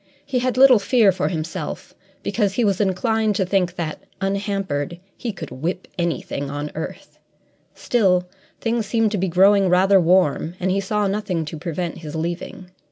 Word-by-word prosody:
He 270 Hz, -3 st, 0 dB
had 255 Hz, 0 st, -1 dB
little 260 Hz, -3 st, +7 dB
fear 215 Hz, -1 st, +4 dB
for 185 Hz, 0 st, -1 dB
himself, 160 Hz, -1 st, -5 dB, 0.3 s
because 200 Hz, -1 st, 0 dB
he 240 Hz, -, +2 dB
was 200 Hz, -1 st, +1 dB
inclined 215 Hz, +2 st, +1 dB
to 190 Hz, -, +1 dB
think 180 Hz, -1 st, 0 dB
that, 160 Hz, -4 st, -4 dB, 0.2 s
unhampered, 195 Hz, -6 st, -2 dB, 0.2 s
he 240 Hz, -, -4 dB
could 170 Hz, -8 st, -8 dB
whip 165 Hz, +8 st, -4 dB
anything 165 Hz, -5 st, -2 dB
on 145 Hz, +1 st, -4 dB
earth; 160 Hz, -, -7 dB, 0.6 s
still, 185 Hz, -6 st, +2 dB, 0.3 s
things 230 Hz, -2 st, -1 dB
seemed 225 Hz, -1 st, +1 dB
to 210 Hz, -, -1 dB
be 190 Hz, -, 0 dB
growing 195 Hz, +2 st, +4 dB
rather 190 Hz, +2 st, +5 dB
warm 170 Hz, -1 st, +2 dB
and 185 Hz, +1 st, 0 dB
he 195 Hz, -, +1 dB
saw 210 Hz, +1 st, 0 dB
nothing 195 Hz, -5 st, -1 dB
to 150 Hz, -, -6 dB
prevent 170 Hz, +2 st, -4 dB
his 155 Hz, -1 st, -8 dB
leaving. 175 Hz, +2 st, -5 dB
190 Hz, 165 wpm, -22 LUFS, 170-205 Hz, 0.6 s, little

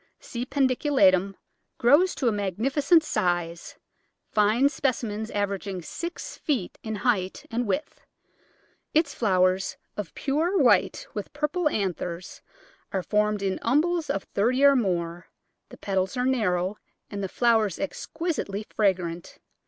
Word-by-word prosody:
C. 240 Hz, +1 st, -6 dB
pedunculatum 255 Hz, -, +3 dB, 0.4 s
grows 295 Hz, +10 st, +4 dB
to 260 Hz, -, -1 dB
a -, -, +4 dB
magnificent 265 Hz, -, +2 dB
size, 175 Hz, -, -1 dB, 0.6 s
fine 215 Hz, +6 st, +4 dB
specimens 230 Hz, -6 st, -2 dB
averaging 200 Hz, -3 st, -3 dB
six 340 Hz, -, -6 dB
feet 260 Hz, -, -2 dB
in 220 Hz, -1 st, -4 dB
height 190 Hz, -7 st, 0 dB
and 235 Hz, 0 st, -1 dB
width. 280 Hz, +9 st, -3 dB, 0.9 s
Its 310 Hz, -2 st, +3 dB
flowers, 185 Hz, -3 st, +1 dB, 0.2 s
of 205 Hz, -6 st, -6 dB
pure 320 Hz, +7 st, 0 dB
white 295 Hz, -, +3 dB
with -, -, -5 dB
purple 300 Hz, +3 st, 0 dB
anthers, 180 Hz, -, -3 dB, 0.5 s
are 190 Hz, -2 st, -1 dB
formed 210 Hz, 0 st, +1 dB
in 190 Hz, -1 st, -1 dB
umbels 315 Hz, +6 st, +1 dB
of 195 Hz, -, -1 dB
thirty 250 Hz, +7 st, +1 dB
or 280 Hz, 0 st, +7 dB
more; 175 Hz, -6 st, -1 dB, 0.4 s
the -, -, -12 dB
petals 190 Hz, +1 st, -1 dB
are 250 Hz, -, +1 dB
narrow 205 Hz, -6 st, +1 dB, 0.3 s
and 200 Hz, -1 st, -4 dB
the 190 Hz, -, -2 dB
flowers 220 Hz, -4 st, +2 dB
exquisitely 295 Hz, -, -3 dB
fragrant. 180 Hz, -5 st, 0 dB
215 Hz, 125 wpm, -26 LUFS, 190-275 Hz, 0.9 s, or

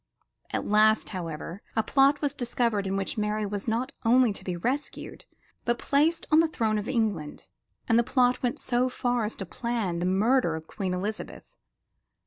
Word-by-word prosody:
At -, -, -2 dB
last, 215 Hz, +1 st, +4 dB
however, 170 Hz, 0 st, -6 dB
a 220 Hz, -, +2 dB
plot 275 Hz, +5 st, +3 dB
was 290 Hz, -3 st, 0 dB
discovered 235 Hz, -4 st, -1 dB
in 195 Hz, +1 st, -1 dB
which 195 Hz, +2 st, -2 dB
Mary 210 Hz, 0 st, -1 dB
was 205 Hz, +2 st, -4 dB
not 230 Hz, +3 st, -1 dB
only 240 Hz, -1 st, +4 dB
to -, -, -8 dB
be 180 Hz, -2 st, -3 dB
rescued, 255 Hz, +11 st, -4 dB, 0.4 s
but 240 Hz, 0 st, 0 dB
placed 305 Hz, +6 st, +1 dB
on 310 Hz, -, +7 dB
the 330 Hz, -, +4 dB
throne 220 Hz, -8 st, 0 dB
of 210 Hz, -, -5 dB
England; 210 Hz, -, -2 dB, 0.4 s
and 230 Hz, 0 st, +4 dB
the -, -, +3 dB
plot 250 Hz, 0 st, +2 dB
went 245 Hz, -1 st, -1 dB
so 250 Hz, +1 st, +1 dB
far 245 Hz, -2 st, 0 dB
as 210 Hz, -, -4 dB
to 195 Hz, -, -5 dB
plan 215 Hz, -4 st, -2 dB
the 175 Hz, -, 0 dB
murder 205 Hz, -1 st, +2 dB
of 160 Hz, 0 st, -7 dB
Queen 185 Hz, +1 st, -3 dB
Elizabeth. 205 Hz, +4 st, -6 dB
220 Hz, 180 wpm, -27 LUFS, 195-250 Hz, 0.4 s, on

